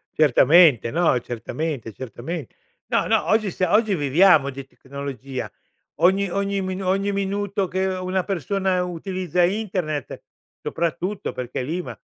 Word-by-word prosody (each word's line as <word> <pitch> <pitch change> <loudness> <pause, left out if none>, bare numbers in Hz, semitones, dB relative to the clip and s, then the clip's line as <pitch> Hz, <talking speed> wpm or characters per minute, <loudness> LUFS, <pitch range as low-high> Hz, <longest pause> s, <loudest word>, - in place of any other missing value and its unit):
certamente, 150 -2 +5
no, 165 -5 +2
certamente, 120 +1 -4
certamen 130 - -6 0.4
no, - - +1
no, - - +2
oggi 215 -3 +2
sia 180 0 -1
oggi 215 -2 +3
viviamo 150 0 +4
di 135 0 -7
tecnologia. 135 -1 -7 0.5
Ogni 195 +2 +3
ogni 200 +2 -1
minu 185 0 -4
ogni 195 +2 +1
minuto 200 0 -1
che 190 +1 -1
una 185 0 -1
persona 190 0 -1
utilizza 180 0 -1
Internet, 180 - -2 0.4
soprattutto 175 +4 -2
perché 125 0 -4
lì 160 +8 -2
ma - - -8
180 Hz, 130 wpm, -23 LUFS, 140-195 Hz, 0.5 s, certamente